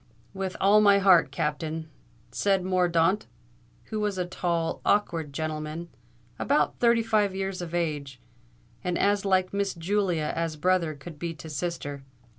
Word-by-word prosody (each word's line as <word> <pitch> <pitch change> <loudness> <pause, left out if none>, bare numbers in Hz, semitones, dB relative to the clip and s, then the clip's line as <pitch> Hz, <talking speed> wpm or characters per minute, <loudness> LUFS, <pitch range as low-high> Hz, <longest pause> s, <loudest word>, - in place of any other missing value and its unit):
"With 190 -1 -4
all 205 +2 +5
my 200 -1 +6
heart, 185 -7 +5
Captain!" 155 +2 -3 0.4
said 195 -2 +1
Mordaunt, 180 +1 +2 0.6
who 215 - -1
was 210 -2 -1
a 180 - 0
tall, 170 -2 -2
awkward 165 -7 +1
gentleman, 155 +2 -4 0.5
about - - +1
thirty 235 -1 +4
five 210 -3 +1
years 195 -1 -3
of 175 -1 -5
age, 145 -6 -2 0.6
and 180 -1 -1
as 205 0 +2
like 185 -1 +2
Miss 200 -1 -1
Julia 175 -3 0
as 165 -1 -2
brother 170 -1 +1
could 145 +2 -11
be 170 0 -4
to 155 +1 -9
sister. 145 -2 -4
175 Hz, 145 wpm, -27 LUFS, 160-195 Hz, 0.6 s, my